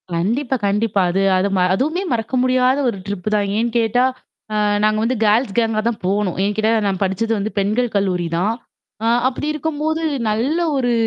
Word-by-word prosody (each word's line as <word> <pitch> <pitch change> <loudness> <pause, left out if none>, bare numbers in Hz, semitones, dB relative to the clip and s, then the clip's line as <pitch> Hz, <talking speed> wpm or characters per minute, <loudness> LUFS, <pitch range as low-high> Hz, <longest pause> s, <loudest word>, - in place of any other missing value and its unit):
கண்டிப்பா, 240 +10 0
கண்டிப்பா. 205 0 +1
அது 195 +2 0 0.2
அது 190 +2 +1
ம - - +2 0.2
அதுவுமே 315 - -1
மறக்க 230 +1 -2
முடியாத 255 +1 +3
ஒரு 200 - -4
ட்ரிப் 200 -1 -5
தான். 205 -1 +1
ஏன்னு 235 +1 0
கேட்டா, 230 +3 +2 0.5
அ - - -1 0.3
நாங்க 215 0 +2
வந்து 250 +3 0
கேர்ள்ஸ் 210 0 +2
கேங்கா 225 -2 +1
தான் 225 - -5
போணோம். 195 -1 0
ஏன்னு 205 0 0
கேட்டா, 220 +1 +2 0.2
நான் 195 0 -2
படிச்சது 210 +4 -1
வந்து 215 +2 -3
பெண்கள் 220 +5 0
கல்லூரி 180 -3 0
தான். 205 +6 +1 0.5
ஆ - - +2 0.2
அப்படி 280 +3 -3
இருக்கும்போது 315 +1 -2 0.3
நல்ல 255 +10 0 0.2
ஒரு 245 -2 +1
225 Hz, 180 wpm, -19 LUFS, 200-255 Hz, 0.5 s, முடியாத